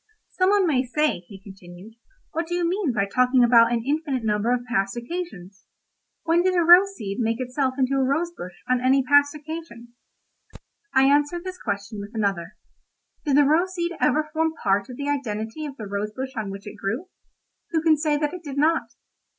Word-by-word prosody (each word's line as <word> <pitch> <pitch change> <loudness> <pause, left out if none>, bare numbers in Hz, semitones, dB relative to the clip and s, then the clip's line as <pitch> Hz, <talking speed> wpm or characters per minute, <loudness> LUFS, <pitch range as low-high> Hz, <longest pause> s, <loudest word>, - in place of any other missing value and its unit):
"Some 370 0 +2
one 405 -1 +3
may 285 -7 +2
say," 300 +2 0
he 195 -2 -11
continued, 190 +1 -13 0.4
"'What 330 +1 -3
do 350 - -2
you 350 -1 0
mean 360 -4 0
by 200 -4 0
talking 250 +4 +3
about 230 -1 +6
an 235 -1 0
infinite 285 -3 -1
number 210 +2 0
of 250 -1 0
past 195 -3 -1
occasions? 235 - -7 0.6
When 330 +1 +3
did 370 0 +1
a 345 - +3
rose 370 +4 +6
seed 200 -2 -5
make 230 0 0
itself 260 +1 -1
into 265 0 +1
a 270 - +2
rose 310 +6 0
bush 180 0 -10
on 255 -1 +1
any 265 +1 +3
past 285 +2 +4
occasion?' 300 -6 -8 1.0
"I 265 0 +4
answer 290 +5 +3
this 370 +1 -8
question 205 0 -4
with 205 +3 -10
another. 195 -6 -2 0.7
'Did 285 -2 +2
the 290 - +6
rose 345 +6 +2
seed 345 -1 -2
ever 305 +3 +2
form 320 0 0
part 195 +2 +1
of 250 - -8
the 285 - -4
identity 260 0 -3
of 280 -1 -10
the 215 - -7
rose 200 +1 -3
bush 265 +4 -6
on 215 -3 -3
which 195 0 -8
it 205 - -9
grew?' 225 - -3 0.6
Who 320 -2 -1
can 320 -1 +5
say 300 0 0
that 295 +2 -1
it 360 - -7
did 285 -3 -7
not? 320 +3 +1
265 Hz, 200 wpm, -24 LUFS, 220-315 Hz, 1.0 s, about